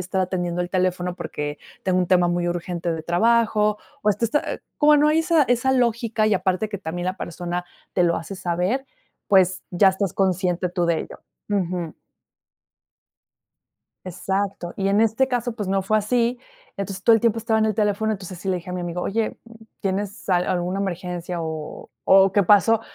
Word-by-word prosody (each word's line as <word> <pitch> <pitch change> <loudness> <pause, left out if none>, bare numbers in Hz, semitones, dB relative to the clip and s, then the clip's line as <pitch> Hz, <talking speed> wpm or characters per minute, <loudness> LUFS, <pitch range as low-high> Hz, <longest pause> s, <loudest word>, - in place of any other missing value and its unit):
estar 180 +1 -2
atendiendo 180 -1 -1
el 175 - -4
teléfono, 180 -1 0
porque 145 0 -5 0.3
tengo 185 -1 +2
un 180 - +1
tema 180 -1 +4
muy 175 0 0
urgente 175 -1 -3
de 160 -1 -4
trabajo." 210 +3 +2 0.2
O, 210 - +3
este 210 +4 -1
está, 290 +6 -1 0.2
como 300 0 +6
no 295 +1 +4
hay 315 +2 +3
esa 325 -2 +3
esa 245 +1 +1
lógica. 230 -3 +1
Y 215 - +3
aparte 185 +3 0
que 205 - -4
también 175 0 -4
la 185 - -2
persona 175 +1 -4 0.3
te 180 - +3
lo 170 -1 +2
hace 165 +4 -6
saber, 185 +10 -1 0.4
pues, 190 -1 +4
ya 190 +2 +5
estás 190 -1 -1
consciente 180 -1 0
tú 175 0 -1
de 170 -1 +2
ello. - - -9 0.3
Ujú. 180 -5 -2 2.1
Exacto, 190 0 -3
y 195 - -1
en 200 +2 +3
este 225 +4 +3
caso, 245 -2 -1
pues 205 -4 -4
no 195 0 +1
fue 215 +3 +2
así, 235 +3 0 0.4
entonces 195 -1 -4
todo 230 - +6
el 225 - +3
tiempo 230 -1 +2
estaba 225 0 +1
en 220 - +3
el 215 - 0
teléfono, 210 +1 +1
entonces, 185 -3 -7
sí 195 - -6
le 185 - +1
dije 180 +1 -8
a - - -4
mi 180 - -3
amigo: 175 0 -4
"Oye, 220 +2 -1 0.4
¿tienes 200 +2 -3
al 180 -1 +3
alguna 180 +1 -1
emergencia? 180 -2 -4
O 160 -1 -6
o 195 0 +6
¿qué 205 - +4
pasó? 210 +4 +5
190 Hz, 190 wpm, -23 LUFS, 180-215 Hz, 2.1 s, como